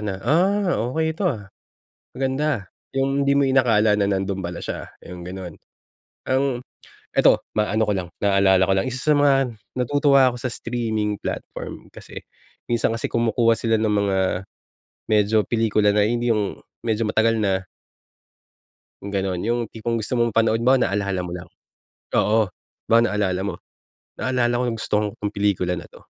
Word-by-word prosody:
na, 105 -2 -2
“Ah, 190 +4 +2 0.2
okey 160 +3 -1
‘to, 180 +3 0
ah, 105 -6 -6 0.7
maganda,” 135 -5 -1 0.2
yung 135 +1 +1
hindi 140 - +4
mo 140 - +4
inakala 120 -6 +3
na 100 - +2
nando'n 95 -1 -1
pala 85 -1 -5
siya, - - -5 0.2
yung 90 -1 -9
gano'n. 90 -2 -7 0.7
Ang 130 -1 +1 0.5
ito, - - +4
maaano 110 +1 +1
ko 105 - 0
lang, 90 -3 -3
naalala 100 -2 +4
ko 95 - +1
lang. 95 +6 0
Isa 130 +4 0
sa - - +4
mga 135 -3 +3 0.2
natutuwa 135 0 +4
ako 125 - -7
sa 130 - -2
streaming 110 -4 -2
platform - - -6
kasi, - - -10 0.4
minsan 120 -1 +1
kasi 115 - -2
kumukuha 115 0 +2
sila 115 0 +1
ng 110 0 0
mga 100 -2 +1 0.9
medyo 105 0 +3
pelikula 105 -3 +2
na, 105 - +4
hindi 120 +1 +1
yung, 105 -2 -2 0.2
medyo 110 -1 0
matagal 110 +1 +2
na. 95 -3 0 1.4
Ganun, 95 -2 -2
yung 120 +4 0
tipong 115 +1 -2
gusto 110 +2 -4
mong 120 -2 +1
panood 115 0 +3
mo 130 +3 +4
naalala 100 -5 0
mo 85 - -6
lang, 90 0 -7 0.7
oo. 110 +1 +3 0.4
Baka 115 +1 +5
naalala 95 -3 0
mo, 95 -3 -3 0.6
"Naalala 120 -2 +1
kong 120 -2 -1
gusto 110 - -6
kong 105 - -1
'tong 105 -1 -4
pelikula 95 -4 0
na - - -11
'to." - - -17
110 Hz, 160 wpm, -22 LUFS, 100-125 Hz, 1.4 s, Baka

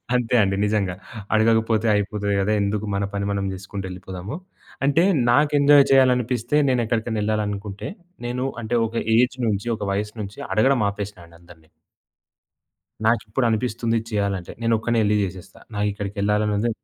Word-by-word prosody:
అంతే 125 -1 +1
అండి 95 -1 +1
నిజంగా. 105 -3 0 0.4
అడగకపోతే 110 0 +3
అయిపోతది 105 0 -1
కదా. 100 +2 0
ఎందుకు 100 +1 -1
మన 100 - 0
పని 100 0 -2
మనం 100 -1 -1
జేసుకుంటూ 95 +1 -7
ఎళ్ళిపోదాము. 95 +6 -7 0.5
అంటే 155 +5 +3 0.3
నాకు 145 +4 +3
ఎంజాయ్ 140 0 +7
చేయాలనిపిస్తే 125 -1 +3
నేనెక్కడికైనా 115 -3 0
ఎళ్ళాలనుకుంటే 105 -1 -3 0.4
నేను 125 +2 -2 0.2
అంటే 115 +2 -2
ఒక 115 - -11 0.2
ఏజ్ 125 +2 +2
నుంచి 105 +1 -1
ఒక - - -6
వయస్సు 105 +2 -3
నుంచి 100 0 -8
అడగడం 130 +3 +3
ఆపేసినా 100 -2 -7
అండి 85 0 -18
అందరిని. 85 -2 -18 1.4
నాకిప్పుడు 115 +2 +1
అనిపిస్తుంది 115 0 -1
ఇది 115 - -11
చేయాలంటే 100 -4 -2
నేనొక్కడినే 115 0 +1
ఎళ్లి 105 +1 +2
జేసేస్తా. 95 -2 -7 0.2
నాకిక్కడికెళ్ళాలనుంది 105 +1 0
105 Hz, 135 wpm, -23 LUFS, 100-120 Hz, 1.4 s, ఎంజాయ్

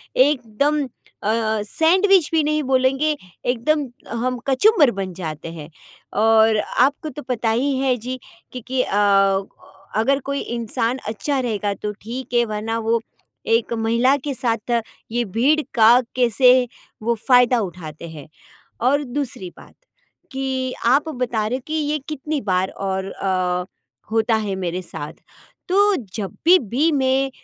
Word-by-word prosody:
एकदम 280 +2 +2 0.4
अ, 220 0 +1
सैंडविच 360 - +3
भी 320 - +3
नहीं 305 0 0
बोलेंगे 270 +3 +2 0.3
एकदम 280 +5 +1 0.4
हम 255 0 -1
कचुम्बर 290 - +5
बन 195 -3 -5
जाते 160 -2 -6
हैं। 150 -2 -9 0.5
और 220 0 +5
आपको 285 +7 +1
तो 295 +2 -8
पता 240 -3 -1
ही 265 +5 +1
है, 265 -1 +2
जी 250 +3 -6 0.3
कि 250 - -6
कि 255 0 +1
अ, - - -3 1.0
अगर 275 +5 +2
कोई 280 0 -2
इंसान 235 +1 -2
अच्छा 265 +6 -2
रहेगा 210 -5 -1
तो 210 +2 -5
ठीक 245 +3 -7
है, 240 0 +4
वरना 220 +1 -3
वो 230 +1 +1 0.6
एक 235 +1 -1
महिला 235 +4 +2
के 280 - -1
साथ 235 -2 -1 0.4
ये 240 +1 0
भीड़ 300 +6 +4
का 220 -1 +6 0.3
कैसे 250 +1 +5 0.5
वो 235 +1 +1
फायदा 250 -1 +5
उठाते 170 -4 -6
हैं। 150 -3 -10 0.6
और 285 +2 +2
दूसरी 250 -7 -4
बात, - - -16 0.6
कि 265 -1 -2
आप 275 +6 +3
बता 245 -6 -2
रहे 250 +4 -1
हो 265 - -16
कि 310 - -4
ये 300 -1 0
कितनी 300 0 -3
बार 185 -2 0
और 190 0 -3
अ, 185 -2 -1 0.5
होता 225 0 +2
है 195 - -2
मेरे 180 -1 -3
साथ, 150 -3 -7 0.5
तो 405 +1 +4
जभी, 225 - +2
भी 265 - 0
मैं 270 -1 +1
245 Hz, 145 wpm, -21 LUFS, 215-275 Hz, 1.0 s, का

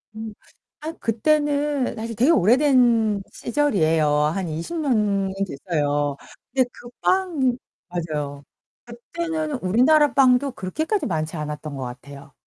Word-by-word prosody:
음. 220 -1 -6 0.5
아 315 - -4
그때는 290 +2 0
사실 230 0 -5
되게 260 +10 +4
오래된 235 - +4
시절이에요. 175 - +1
한 150 +5 +1
20 165 - -4
년이 210 -9 +1
됐어요. 145 -3 -1 0.4
근데 260 -2 +3
그 240 - -12
빵 320 -10 +1 0.3
맞아요. 150 -5 -4 0.4
그때는 310 +6 -4
우리나라 280 +10 +4
빵도 265 0 +4
그렇게까지 315 - -2
많지 160 -1 -2
않았던 150 -1 -5
것 135 - -5
같아요. 140 +3 -10
225 Hz, 255 characters per minute, -23 LUFS, -, 0.5 s, 되게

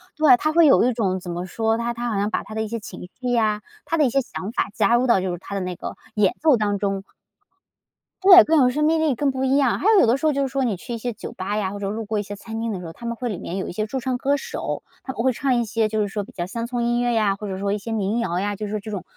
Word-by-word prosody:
对， 310 -5 +6
他 310 - 0
会 335 +1 +5
有 280 - +6
一 250 +1 +2
种 190 -5 0
怎 175 -1 -7
么 175 +1 -4
说， 225 +4 0
他 235 +1 -2
他 240 +1 -3
好 220 - -2
像 205 +1 0
把 - - -1
他 215 - -10
的 220 - -1
一 - - -4
些 230 +2 -4
情 190 -3 -9
绪 250 -1 -2
呀， 215 -3 +1 0.2
他 330 - -1
的 305 - +4
一 - - +2
些 275 +3 +2
想 200 -4 -6
法 235 - -1
加 220 +1 +3
入 250 +2 +2
到 215 -6 +4
就 185 - -2
是 175 - -4
他 200 - -10
的 195 - -1
那 180 -1 -4
个 - - -7 0.2
演 205 -3 +2
奏 305 -5 +5
当 205 -2 0
中。 195 -1 -2 1.2
对， 370 -2 +10
更 320 +1 +3
有 250 - +5
生 300 +4 0
命 320 +1 +3
力， 305 -5 +2
更 280 +2 +1
不 260 0 -3
一 265 +1 +3
样， 270 -4 +2
还 - - -5
有 425 - +6
有 - - +5
的 235 - +4
时 295 - -3
候 310 - +4
就 280 -1 -1
是 270 - 0
说 270 0 -1
你 225 -7 0
去 240 - -7
一 230 - -2
些 245 +2 -3
酒 215 - -8
吧 200 +3 -3
呀， 195 -3 -1
或 - - -5
者 195 - -3
路 220 +2 -4
过 215 +1 -2
一 - - -2
些 205 0 -8
餐 225 +2 -7
厅 230 - -2
的 190 - -4
时 180 - -8
候， 165 - -8
他 235 - -11
们 235 0 -3
会 250 - -3
里 210 -6 -3
面 180 0 -5
有 190 - -3
一 - - -6
些 215 +3 -1
驻 260 +5 -3
唱 255 0 -2
歌 280 +3 +1
手， - - -4 0.2
他 265 - -4
们 230 - -4
会 255 +1 +2
唱 265 +3 0
一 235 - +1
些， 220 0 0
就 215 0 -1
是 210 - +1
说 205 +1 -3
比 - - -13
较 175 - -4
乡 230 +5 -4
村 240 -1 -2
音 240 0 +1
乐 245 0 +1
呀， 210 -3 +2
或 205 +1 -7
者 190 0 -4
说 200 0 -1
一 - - 0
些 220 +3 -7
民 215 +1 0
谣 180 -6 -1
呀， 205 +1 -1
就 210 - -5
是 210 +1 -3
这 215 +2 -8
种 200 -3 -4
225 Hz, 365 characters per minute, -23 LUFS, 200-255 Hz, 1.2 s, 对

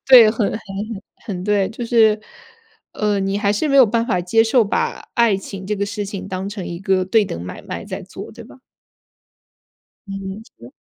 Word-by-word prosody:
对， 240 -5 +9
很 220 -2 0
很 - - -3
很 - - -15 0.7
很 185 -4 -4
对， 205 -2 +2
就 235 +2 -5
是， 220 -2 +4 0.7
呃， 210 -2 0
你 195 +1 0
还 200 -1 +2
是 210 +9 0
没 275 - +2
有 265 -3 +9
办 230 +2 0
法 180 -7 +1
接 225 +6 +3
受， 230 +1 +4
把 470 - -2
爱 235 -4 +4
情 195 0 -8
这 210 +2 -1
个 200 0 -1
事 205 0 -4
情 195 -1 -6
当 190 0 -4
成 205 -3 -6
一 170 0 -5
个 190 -1 +1
对 210 +2 +3
等 85 - -5
买 90 - -7
卖 - - -6
在 - - -5
做， - - -9
对 - - -11
吧？ - - -16 1.5
嗯， 195 +2 -6 0.2
是。 120 +2 -12
205 Hz, 215 characters per minute, -20 LUFS, 195-225 Hz, 1.5 s, 对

